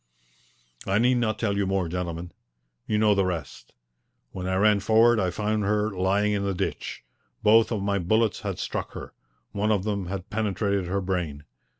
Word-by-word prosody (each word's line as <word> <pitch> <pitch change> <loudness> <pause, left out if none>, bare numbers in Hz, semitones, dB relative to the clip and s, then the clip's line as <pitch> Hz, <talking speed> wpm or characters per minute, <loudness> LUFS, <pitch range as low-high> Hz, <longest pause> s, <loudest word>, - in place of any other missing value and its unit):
I 95 - +2
need 125 +3 +3
not 110 -2 0
tell 100 -3 0
you 100 -1 0
more, 95 -2 0
gentlemen. 85 0 -4 0.6
You 105 - +1
know 105 -1 +4
the 100 -1 +2
rest. 80 -9 -5 0.6
When 90 -1 -5
I 95 - 0
ran 105 +1 +4
forward 110 +3 +4
I 95 - +1
found 105 +2 -1
her 105 +1 +1
lying 100 +2 +1
in 100 -1 0
the 100 -1 -1
ditch. - - -4 0.4
Both 110 +2 +5
of 105 -4 -1
my 100 0 0
bullets 110 +5 +1
had - - -4
struck - - -4
her. - - -8 0.4
One 105 +2 0
of 100 -3 +1
them 100 -3 -2
had 95 0 -6
penetrated 100 -3 -1
her 100 +2 -1
brain. 90 -6 -3
100 Hz, 185 wpm, -26 LUFS, 95-105 Hz, 0.6 s, Both